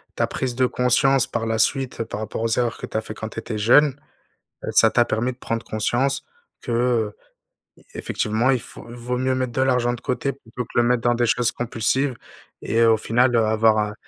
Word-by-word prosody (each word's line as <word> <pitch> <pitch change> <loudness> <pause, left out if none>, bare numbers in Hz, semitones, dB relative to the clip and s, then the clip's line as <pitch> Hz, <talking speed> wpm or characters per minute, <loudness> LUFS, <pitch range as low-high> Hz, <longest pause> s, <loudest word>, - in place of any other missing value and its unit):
ta - - +1
prise 130 -2 -3
de 130 +1 +3
conscience 125 +1 +3
par 115 -1 -3
la 115 0 -1
suite 125 +1 0
par 110 -2 -6
rapport 110 +1 -5
aux 115 - 0
erreurs 120 -2 -1
que - - -6
tu - - -13
as - - 0
fait 110 - -7
quand 110 - -6
tu 115 - -6
étais 110 -1 -5
jeune, 135 +6 +4 0.7
heu, - - -4
ça 110 - +5
t'a 120 - +3
permis 115 +4 -1
de 125 - -17
prendre 115 -2 -3
conscience 120 +6 -1 0.4
que, - - -7
heu, 115 -3 0 0.8
effectivement 110 +5 0
il 130 -2 +1
faut - - -10
vaut 120 +1 -4
mieux 130 +1 0
mettre 130 -1 -2
de 130 - 0
l'argent 125 -2 +2
de 120 - -9
côté 130 +2 -2
plutôt 125 -2 -8
que - - -4
le - - +6
mettre 120 0 +2
dans 120 0 +2
des 120 0 +1
choses 120 0 +2
compulsives 120 +3 -1 0.5
et 115 +1 +1
au 115 -1 +5
final, 120 +3 +2
heu, 115 -1 +4
avoir, 110 0 +3
heu - - -9
120 Hz, 220 wpm, -22 LUFS, 115-125 Hz, 0.8 s, le